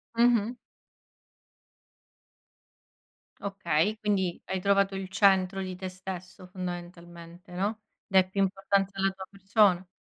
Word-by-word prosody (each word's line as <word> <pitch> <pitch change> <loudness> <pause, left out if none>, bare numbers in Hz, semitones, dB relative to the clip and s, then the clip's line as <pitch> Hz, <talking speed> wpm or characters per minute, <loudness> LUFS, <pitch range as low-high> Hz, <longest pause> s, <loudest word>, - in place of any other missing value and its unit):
Mh-mh. 235 0 +3 2.9
Okay, 195 0 0
quindi 195 -5 0
hai 190 - -2
trovato 200 0 +2
il 190 -1 -5
centro 195 -1 +3
di 185 -1 -4
te 185 +1 -5
stesso 185 0 -8
fondamentalmente, 175 0 -8
no? 205 +4 -2 0.3
Dai 190 -2 +4
più 195 +1 -1
importanza 195 0 0
alla 195 0 +2
tua 190 0 -9
persona. 195 -2 +2
190 Hz, 110 wpm, -28 LUFS, 185-200 Hz, 2.9 s, Dai